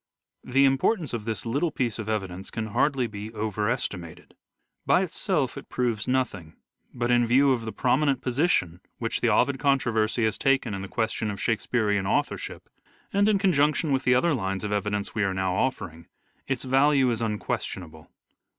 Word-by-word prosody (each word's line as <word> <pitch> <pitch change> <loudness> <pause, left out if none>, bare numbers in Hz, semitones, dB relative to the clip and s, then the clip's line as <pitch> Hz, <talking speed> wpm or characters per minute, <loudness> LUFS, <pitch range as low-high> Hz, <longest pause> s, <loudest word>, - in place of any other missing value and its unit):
The 135 +2 +3
importance 140 - +1
of 110 -3 -4
this 115 0 -3
little 140 +9 0
piece 120 -6 -2
of 110 -1 -4
evidence 95 -3 -3
can 110 -1 -4
hardly 135 +4 +1
be 105 -1 -7
over 105 -1 -1
estimated. 90 -9 -5 0.5
By 185 - +3
itself 165 - -1
it - - -15
proves 120 -3 -1
nothing, 125 -11 -1 0.4
but 120 0 -1
in 120 -1 +3
view 135 +4 +4
of 120 -3 0
the 110 - -4
prominent 135 +3 +1
position 125 - 0 0.2
which 115 -1 -3
the 120 - +3
Ovid 130 +5 +2
controversy 120 -5 +1
has 110 -2 -1
taken 135 -5 +2
in 95 - -4
the 100 - -6
question 110 0 -2
of 100 -1 -5
Shakespearean 105 -4 0
authorship, - - -2 0.5
and 200 +1 +3
in 210 - +4
conjunction 155 -5 +2
with 135 0 +1
the 125 - +4
other 165 +6 +3
lines 95 -6 -2
of 105 - -3
evidence 105 0 -2
we 105 - 0
are 95 -1 0
now 95 -1 0
offering, 90 -8 -2 0.4
its 135 -3 -2
value 135 0 +3
is 115 -1 -2
un 110 -2 -1
questionable. - - -5
120 Hz, 180 wpm, -26 LUFS, 105-135 Hz, 0.5 s, view